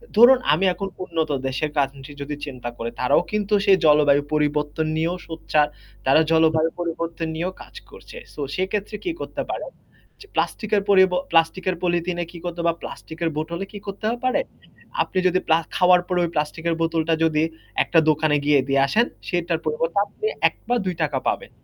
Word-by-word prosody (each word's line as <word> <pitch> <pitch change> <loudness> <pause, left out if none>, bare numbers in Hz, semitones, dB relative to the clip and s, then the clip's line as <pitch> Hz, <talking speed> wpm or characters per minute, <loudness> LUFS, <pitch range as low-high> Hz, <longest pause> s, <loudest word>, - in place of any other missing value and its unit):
ধরুন 245 +3 +8
আমি 175 +6 +2
এখন 195 +3 -4 0.2
উন্নত 165 -3 -2 0.2
দেশের 135 +4 -1
কান্ট্রি 140 0 -2
যদি 145 +1 -4
চিন্তা 125 -4 -6
করি, 115 - -3
তারাও 125 +3 +3
কিন্তু 210 0 -1
সেই 195 -2 +6
জলবায়ু 145 -2 +5
পরিবর্তন 150 +1 0
নিয়েও 165 +3 0
সোচ্চার, 155 -2 +1 0.4
তারা 135 +4 +5
জলবায়ু 160 0 +4
পরিবর্তন 170 -1 -3
নিয়েও 175 +3 -2
কাজ - - -14
করছে। 485 - -12 0.2
সো - - -7
সেক্ষেত্রে 200 +3 -2
কি 350 - 0
করতে - - -4
পারেন - - -5 0.5
যে 410 - -13
প্লাস্টিকের 215 -2 0
পরিব 190 -2 +6 0.2
প্লাস্টিকের 175 +3 +2
পলিথিনে 175 0 0
কি 175 - -10
করতে 175 -1 -5
হবে 170 - 0
বা 165 - 0
প্লাস্টিকের 165 +1 -5
বোতলে 170 +4 -3
কি 205 - -8
করতে 200 +2 -6 0.2
পারে? 255 - +2 0.6
আপনি - - -7
যদি 185 0 +2
প্লা 160 - +5 0.2
খাওয়ার 180 0 +5
পরে 180 -1 0
ওই 170 - 0
প্লাস্টিকের 160 +2 -1
বোতলটা 165 0 +1
যদি 155 -1 +2 0.4
একটা 165 - +3
দোকানে 155 0 +2
গিয়ে 145 -1 +5
দিয়ে 135 0 +3
আসেন। 225 +11 +3 0.2
সেটার 175 -2 0
পরিবর্তে 165 +3 -1
আপনি 210 - -8 0.2
১ - - -5 0.2
বা 245 - +3
৳২ 160 -6 -1
পাবেন। - - -1
165 Hz, 170 wpm, -23 LUFS, 150-185 Hz, 0.6 s, ধরুন